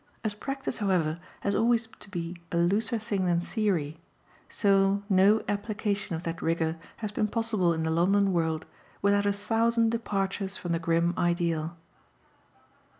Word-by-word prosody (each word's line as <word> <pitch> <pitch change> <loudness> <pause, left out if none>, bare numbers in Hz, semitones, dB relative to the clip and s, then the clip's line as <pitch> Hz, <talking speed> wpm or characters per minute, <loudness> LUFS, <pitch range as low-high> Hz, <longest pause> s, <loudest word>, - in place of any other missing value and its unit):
As 215 -2 -1
practice, 270 +3 -4
however, 175 -6 +1 0.2
has 200 - 0
always 230 +1 +3
to - - -11
be 175 -2 -4 0.2
a 170 - 0
looser 200 +7 +2
thing 205 -4 -1
than 170 -1 +3
theory, 175 -6 -1 0.5
so 195 0 +3
no 200 +2 +4
application 205 -2 -2
of 160 - -6
that 165 +1 -4
rigour 165 0 0 0.2
has 215 -3 -4
been 210 +1 0
possible 215 -5 +1
in 160 -1 -1
the 160 - 0
London 195 +4 +3
world 160 -2 0 0.4
without 200 0 +3
a - - +4
thousand 225 +2 +2
departures 195 -3 -2
from 175 - -4
the 165 - +1
grim 170 +1 +1
ideal. 170 -1 0
195 Hz, 150 wpm, -28 LUFS, 170-210 Hz, 0.5 s, no